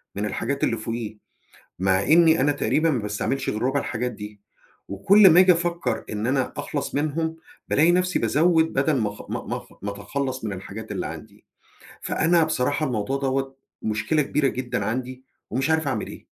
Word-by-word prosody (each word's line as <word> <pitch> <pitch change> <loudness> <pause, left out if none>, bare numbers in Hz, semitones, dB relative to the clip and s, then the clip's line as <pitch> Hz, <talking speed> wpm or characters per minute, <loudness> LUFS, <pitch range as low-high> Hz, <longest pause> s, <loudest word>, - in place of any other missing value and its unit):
من 100 +1 -2
الحاجات 140 +6 -2
اللي 115 - +1
فوقيه 110 -1 -5 0.6
مع 95 +1 +2
إني 160 +2 +5
أنا 145 +2 +3
تقريبًا 155 +2 +1
ما 130 - 0
باستعملش 105 +6 -2
غير 105 - -3
ربع 135 +3 +1
الحاجات 125 0 -3
دي 105 -1 -10 0.5
وكُل 190 - +6
ما 170 - +7
آجي 185 0 +7
أفكر 170 0 -1
إن 105 +2 -3
أنا 130 0 0
أخلص 145 -2 -4
منهم، 160 +2 -1 0.3
بالاقي 160 +4 +4
نفسي 180 +1 +1
بازود 160 +1 +2
بدل 140 +1 +2
ما 110 -3 0
أخ - - -11
ما - - -3
ما - - -3
أخ - - -13
ما 100 - -2
أتخلص 130 +5 -4
من 105 - -3
الحاجات 100 +4 -8
اللي - - -3
عندي - - -11 0.6
فأنا 165 0 +2
بصراحة 150 0 0
الموضوع 125 +2 -2
دوّة 135 0 -2 0.3
مشكلة 110 +8 0
كبيرة 140 0 +1
جدًا 125 -5 -3
عندي 130 +4 -4 0.3
ومش 135 +6 -1
عارف 160 -2 +1
أعمل 110 -6 -2
إيه. - - -11
135 Hz, 180 wpm, -24 LUFS, 110-160 Hz, 0.6 s, ما